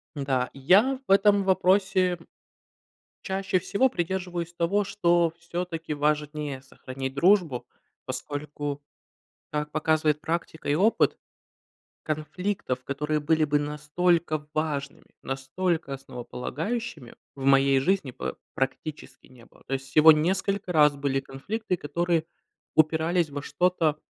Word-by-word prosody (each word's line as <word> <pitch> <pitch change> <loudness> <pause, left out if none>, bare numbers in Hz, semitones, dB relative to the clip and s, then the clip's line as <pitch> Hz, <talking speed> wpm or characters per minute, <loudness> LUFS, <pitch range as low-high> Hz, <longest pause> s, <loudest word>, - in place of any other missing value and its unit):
Да, 135 -3 0
я 195 - +4
в - - -1
этом 200 0 +5
вопросе, 190 -1 +2 1.1
чаще 190 -1 0
всего 235 +8 +2
придерживаюсь 175 -2 -3
того, 175 +5 +1
что 175 -4 +2
всё-таки 170 -2 -4
важнее 150 -1 -1
сохранить 130 0 -7
дружбу, 170 -5 +3 0.4
поскольку, 145 0 -5 0.7
как 150 0 -2
показывает 155 -1 +1
практика 165 -1 -4
и 145 - +3
опыт, 205 +8 +3 0.9
конфликтов, 155 -3 -3
которые 150 +2 -1
были 155 +1 +2
бы 145 0 +2
настолько 150 +1 0
важными, 145 -3 -3
настолько 140 +4 -2
основополагающими 135 - -5 0.2
в 135 - -6
моей 135 0 +5
жизни 170 -3 0
па 130 - -5 0.2
практически 135 +3 -4
не 125 -2 -17
было. - - -22
То 135 - -2
есть 135 0 -4
всего 155 +2 +8
несколько 185 +4 0
раз 150 -3 +5
были 135 -1 0
конфликты, 180 +10 -4
которые 170 +1 0 0.5
упирались 160 +2 +3
во 145 0 -6
что-то, 170 -2 +1
155 Hz, 115 wpm, -26 LUFS, 140-180 Hz, 1.1 s, всего